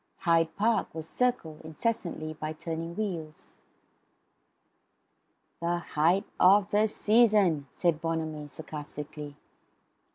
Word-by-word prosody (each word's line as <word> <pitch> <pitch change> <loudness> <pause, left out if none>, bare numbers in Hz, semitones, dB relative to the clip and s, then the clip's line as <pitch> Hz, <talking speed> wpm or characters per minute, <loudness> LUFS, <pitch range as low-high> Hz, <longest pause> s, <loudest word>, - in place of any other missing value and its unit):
Hyde 165 -3 +2
Park 220 -2 +1
was 160 -1 -5
circled, 240 -10 -1
incessantly, 160 -2 -3
by 155 0 -5
turning 165 +1 -5
wheels. 170 -8 -5 2.1
"The 170 +1 0
height 170 +3 +1
of 200 +2 +5
the 210 +1 +4
season," 210 -9 +3
said 165 -3 0
Bonamy 160 -2 -3
sarcastically. 150 -1 -8
165 Hz, 95 wpm, -29 LUFS, 155-200 Hz, 2.1 s, of